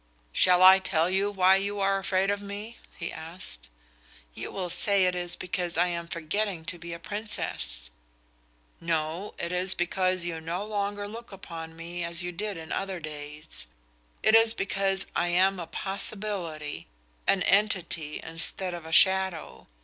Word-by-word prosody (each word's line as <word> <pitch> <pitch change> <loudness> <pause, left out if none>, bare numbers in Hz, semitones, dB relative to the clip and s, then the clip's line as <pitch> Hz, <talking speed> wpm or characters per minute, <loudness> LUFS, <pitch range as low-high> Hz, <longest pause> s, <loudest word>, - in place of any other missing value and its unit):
"Shall 180 - +5
I 190 +1 +10
tell 170 -2 +1
you 195 +2 +2
why 190 -1 +5
you 200 +1 -2
are 195 0 +2
afraid 195 0 +1
of 205 0 -2
me?" 205 +3 -7 0.2
he 170 - -4
asked. 160 - -8 0.6
"You - - -5
will 180 -3 -4
say 200 0 +3
it 180 - +2
is 175 -1 0
because 180 -2 -3
I 175 +1 +3
am 170 -1 -4
forgetting 170 +1 -2
to 175 +1 -4
be 170 +1 -7
a 170 - -4
Princess." 150 - -3 0.9
"No; 165 +3 -2
it 170 - -3
is 180 +1 +6
because 185 0 +1
you 165 -2 -3
no 170 +5 -3
longer 205 -1 -2
look 230 +2 -9
upon 165 -4 -8
me 170 +1 -5
as 170 +1 -2
you 175 - -3
did 205 +2 -4
in 160 -1 -8
other 195 -2 -2
days. 150 - -7 0.6
It 220 - +5
is 225 0 +7
because 195 -1 0
I 175 - +2
am 185 +2 +3
a 170 - -5
possibility, 180 - -3 0.4
an 190 -2 +4
entity 175 -7 +1
instead 170 +3 -2
of 170 -2 -7
a - - -8
shadow. 190 -1 +3
180 Hz, 165 wpm, -28 LUFS, 165-195 Hz, 0.9 s, I